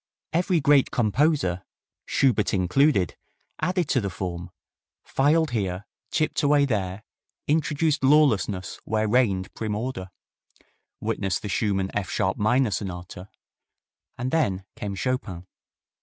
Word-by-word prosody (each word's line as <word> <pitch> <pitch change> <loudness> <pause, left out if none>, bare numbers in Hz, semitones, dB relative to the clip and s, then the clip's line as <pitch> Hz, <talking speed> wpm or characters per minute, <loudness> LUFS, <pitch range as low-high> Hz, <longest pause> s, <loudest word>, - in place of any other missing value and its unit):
Every 175 +1 +2
great 140 -2 +4
composer, 115 - +1 0.4
Schubert 115 -7 +2
included, 95 - +2 0.5
added 180 -3 0
to 130 - +2
the 100 - -2
form, 90 -1 -5 0.5
filed 155 +3 +2
here, 100 -4 -2 0.2
chipped 155 -1 0
away 145 -1 +4
there, 100 -5 -2 0.4
introduced 150 0 +1
lawlessness 125 - +2
where 110 0 0
reigned 105 -5 +1
prim 110 -2 -3
order 105 -5 -4 0.9
witness 95 -1 -1
the 105 - -6
Schumann 95 -1 0
F 105 -2 -2
sharp 95 - 0
minor 120 +3 +2
Sonata 90 -1 -5 0.9
and 125 +2 -3
then 100 - 0
came 100 -1 -5
Chopin. 95 -7 -3
110 Hz, 115 wpm, -25 LUFS, 95-140 Hz, 0.9 s, great